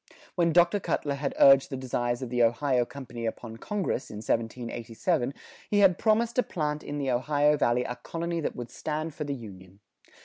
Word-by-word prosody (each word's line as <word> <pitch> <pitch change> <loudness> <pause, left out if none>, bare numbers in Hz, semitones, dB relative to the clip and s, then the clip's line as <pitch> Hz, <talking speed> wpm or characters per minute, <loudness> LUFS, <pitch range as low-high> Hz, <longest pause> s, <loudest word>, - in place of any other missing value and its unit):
When 170 -2 +2
Dr. 175 +4 +4
Cutler 145 -6 -1
had 140 0 -3
urged 135 -1 +7
the 135 - -4
desires 120 -1 -2
of 125 - -6
the 125 -1 +1
Ohio 120 +2 +2
Company 120 -4 -6
upon 115 0 -6
Congress, 195 - -3
in - - -8
1787, 115 - -2 0.4
he 205 - +1
had 185 -3 +5
promised 225 +2 +2
to - - +6
plant 150 -8 -3
in 145 - -5
the 135 -2 -1
Ohio 145 +4 +2
Valley 125 -3 +2
a 125 - -4
colony 170 +6 -4
that - - -3
would 120 -1 -7
stand 155 +2 -4
for 150 - -5
the 140 -1 -3
Union. 95 -5 -12
135 Hz, 190 wpm, -28 LUFS, 120-160 Hz, 0.4 s, urged